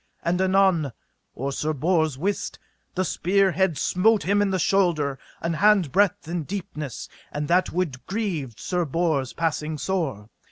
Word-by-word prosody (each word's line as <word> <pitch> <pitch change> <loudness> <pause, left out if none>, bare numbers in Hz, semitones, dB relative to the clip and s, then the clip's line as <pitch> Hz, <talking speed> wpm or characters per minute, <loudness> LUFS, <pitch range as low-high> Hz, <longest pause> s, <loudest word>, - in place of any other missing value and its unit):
And 180 +2 +1
anon, 190 -7 +3 0.4
or 135 +2 -3
Sir 155 +3 -1
Bors 160 -1 +1
wist, 195 +7 -2 0.4
the 185 0 +1
spear 190 +3 +2
head 175 -2 +1
smote 210 +4 +3
him 205 +2 +2
into 200 -2 +1
the - - +2
shoulder 165 -8 +1 0.2
an 165 0 -1
hand 195 -3 +4
breadth 195 -4 +2
in 170 0 -2
deepness, 155 - -5 0.2
and 145 0 -3
that 180 +2 +3
wound 160 -8 -2
grieved 170 - -3
Sir 180 -1 -1
Bors 155 -5 0
passing 155 -1 -1
sore. 140 - -2
170 Hz, 155 wpm, -24 LUFS, 150-190 Hz, 0.4 s, hand